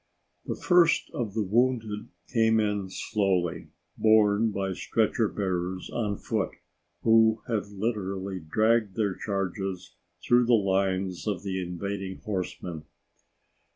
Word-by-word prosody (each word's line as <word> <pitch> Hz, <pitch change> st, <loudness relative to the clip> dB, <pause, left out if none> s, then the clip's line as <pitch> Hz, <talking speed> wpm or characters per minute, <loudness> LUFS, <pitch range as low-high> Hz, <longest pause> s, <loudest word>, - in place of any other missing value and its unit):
The -, -, -2 dB
first 175 Hz, -2 st, +3 dB
of 110 Hz, -4 st, -3 dB
the 110 Hz, -, +1 dB
wounded 110 Hz, 0 st, 0 dB, 0.3 s
came 110 Hz, -2 st, +4 dB
in 105 Hz, -3 st, -1 dB
slowly, 90 Hz, -5 st, -1 dB, 0.3 s
borne 110 Hz, 0 st, +4 dB
by 95 Hz, -2 st, -2 dB
stretcher -, -, +1 dB
bearers 95 Hz, -2 st, -3 dB
on 105 Hz, -4 st, -1 dB
foot 110 Hz, -4 st, -1 dB, 0.5 s
who 110 Hz, -1 st, +4 dB
had 110 Hz, -4 st, -1 dB
literally 100 Hz, -2 st, -3 dB
dragged 110 Hz, +5 st, +1 dB
their 105 Hz, -4 st, +1 dB
charges 95 Hz, -2 st, -3 dB, 0.3 s
through 120 Hz, 0 st, +4 dB
the 120 Hz, -, +4 dB
lines 95 Hz, -2 st, 0 dB
of 100 Hz, -2 st, -2 dB
invading 95 Hz, +1 st, -4 dB
horsemen. 90 Hz, -5 st, -4 dB
100 Hz, 115 wpm, -27 LUFS, 95-110 Hz, 0.5 s, came